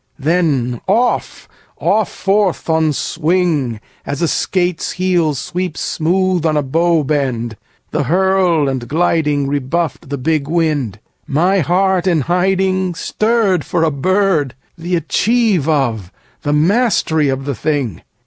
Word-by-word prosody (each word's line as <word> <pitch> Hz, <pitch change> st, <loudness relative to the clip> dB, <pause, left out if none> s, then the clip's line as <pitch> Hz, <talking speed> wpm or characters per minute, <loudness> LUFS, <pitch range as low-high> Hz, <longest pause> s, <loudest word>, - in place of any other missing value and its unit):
then 145 Hz, -6 st, 0 dB
off, 235 Hz, +6 st, 0 dB, 0.3 s
off 215 Hz, 0 st, +1 dB
forth 195 Hz, -2 st, 0 dB
on 160 Hz, -1 st, +2 dB
swing, 155 Hz, -6 st, 0 dB, 0.2 s
As 140 Hz, 0 st, -4 dB
a -, -, +3 dB
skate's 175 Hz, 0 st, -1 dB
heel 175 Hz, -5 st, +1 dB
sweeps 180 Hz, +4 st, -4 dB
smooth 180 Hz, +1 st, 0 dB
on 155 Hz, -2 st, +1 dB
a 150 Hz, -, +1 dB
bow 165 Hz, +3 st, +1 dB
bend: 130 Hz, -6 st, -1 dB, 0.4 s
the -, -, -1 dB
hurl 180 Hz, -1 st, +2 dB
and 130 Hz, -3 st, -3 dB
gliding 150 Hz, -3 st, +1 dB
Rebuffed 145 Hz, +2 st, -2 dB
the 140 Hz, -, -3 dB
big 145 Hz, +2 st, -1 dB
wind. 150 Hz, -, -1 dB, 0.3 s
My 180 Hz, +7 st, +2 dB
heart 185 Hz, +2 st, +1 dB
in 170 Hz, -4 st, +2 dB
hiding 185 Hz, +2 st, 0 dB
Stirred 215 Hz, -4 st, +1 dB
for 170 Hz, -2 st, -1 dB
a 160 Hz, -, +2 dB
bird, 160 Hz, -2 st, +1 dB, 0.2 s
the 175 Hz, +2 st, -2 dB
achieve 190 Hz, -, +1 dB
of, 115 Hz, -, 0 dB, 0.3 s
the 145 Hz, -, -1 dB
mastery 160 Hz, -, +2 dB
of 135 Hz, 0 st, -2 dB
the 140 Hz, -, -2 dB
thing! 135 Hz, -, -2 dB
160 Hz, 130 wpm, -16 LUFS, 145-185 Hz, 0.4 s, a